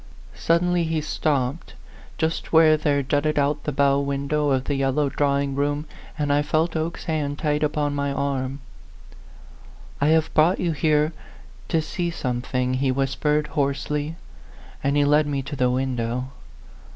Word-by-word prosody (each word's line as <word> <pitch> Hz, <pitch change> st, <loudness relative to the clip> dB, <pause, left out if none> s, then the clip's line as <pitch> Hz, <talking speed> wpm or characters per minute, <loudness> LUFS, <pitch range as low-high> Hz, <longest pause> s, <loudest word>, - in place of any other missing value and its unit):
Suddenly 175 Hz, +1 st, +1 dB
he 160 Hz, 0 st, 0 dB
stopped, 150 Hz, -1 st, -2 dB, 0.4 s
just 160 Hz, 0 st, -2 dB
where 160 Hz, -1 st, +6 dB
there 145 Hz, -2 st, +1 dB
jutted 145 Hz, +3 st, 0 dB
out 145 Hz, +1 st, 0 dB
the 150 Hz, -, -1 dB
bow 140 Hz, 0 st, +3 dB
window 140 Hz, +1 st, -1 dB
of 130 Hz, -2 st, +1 dB
the 145 Hz, -, -2 dB
yellow 135 Hz, +1 st, +1 dB
drawing 140 Hz, 0 st, 0 dB
room, 145 Hz, +2 st, -1 dB, 0.3 s
and 145 Hz, -2 st, +1 dB
I 145 Hz, -, +3 dB
felt 155 Hz, +3 st, 0 dB
Oke's 160 Hz, +1 st, -3 dB
hand 150 Hz, -4 st, -2 dB
tight 150 Hz, -2 st, 0 dB
upon 150 Hz, -1 st, 0 dB
my 140 Hz, 0 st, -1 dB
arm. 140 Hz, -1 st, -2 dB, 1.4 s
"I 145 Hz, -, +3 dB
have 160 Hz, 0 st, +2 dB
brought 165 Hz, +4 st, +4 dB
you 175 Hz, -, 0 dB
here 155 Hz, 0 st, +1 dB, 0.5 s
to 165 Hz, -2 st, +1 dB
see 175 Hz, +2 st, -2 dB
some 125 Hz, -7 st, -3 dB
thing," 125 Hz, 0 st, -1 dB
he 130 Hz, +1 st, +1 dB
whispered, 145 Hz, +3 st, 0 dB
hoarsely; 145 Hz, +2 st, -2 dB, 0.7 s
and 140 Hz, +1 st, +1 dB
he 145 Hz, -, +4 dB
led 150 Hz, +1 st, +3 dB
me 140 Hz, -2 st, -2 dB
to 140 Hz, +2 st, -6 dB
the 125 Hz, -2 st, +2 dB
window. 125 Hz, -1 st, -2 dB
145 Hz, 155 wpm, -23 LUFS, 140-155 Hz, 1.4 s, where